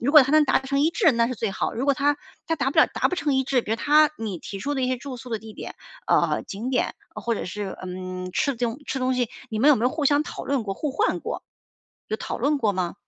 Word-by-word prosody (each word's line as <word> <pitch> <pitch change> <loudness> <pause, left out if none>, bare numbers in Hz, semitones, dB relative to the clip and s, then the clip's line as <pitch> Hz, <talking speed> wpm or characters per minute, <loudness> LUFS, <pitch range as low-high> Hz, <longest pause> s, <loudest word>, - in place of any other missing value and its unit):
如 245 - +1
果 300 -2 +10
他 270 +2 -1
能 310 0 +6
达 260 - +3
成 275 +1 -1
一 310 +3 +4
致， 335 - +4
那 230 -1 +2
是 255 - -3
最 225 -2 -2
好。 - - -2
如 240 - -2
果 280 - +4
他 285 +2 +2 0.3
他 325 - 0
达 270 -2 0
不 - - -1
了 - - +8
达 - - 0
不 - - -1
成 295 -4 0
一 265 0 +2
致。 260 -1 +2
比 - - -7
如 - - +1
他 300 +4 +5
你 210 -5 -4
提 195 - -7
出 285 +9 -2
的 270 - -1
一 - - +2
些 255 - 0
住 255 +1 -7
宿 250 - -10
的 225 - -2
地 220 +1 -11
点， - - -8 0.3
啊， - - +3
景 220 +6 -5
点 255 - 0 0.2
或 235 - -1
者 - - -4
是， 200 +1 -5
嗯， 185 0 -5
吃 280 +5 0
囧 235 +2 -2
吃 270 - -2
东 255 0 +1
西， 245 -3 0 0.2
你 220 - -2
们 270 +7 +5
有 295 - +7
没 225 - -1
有 250 - +3
互 310 0 -2
相 290 +1 +4
讨 - - -7
论 275 -3 0
过、 200 -2 -3
互 295 +8 -2
换 275 - 0
过？ - - -4 0.7
有 215 - -1
讨 - - -5
论 290 +5 +2
过 220 -6 +2
吗？ 185 -2 -2
255 Hz, 310 characters per minute, -24 LUFS, 220-285 Hz, 0.7 s, 果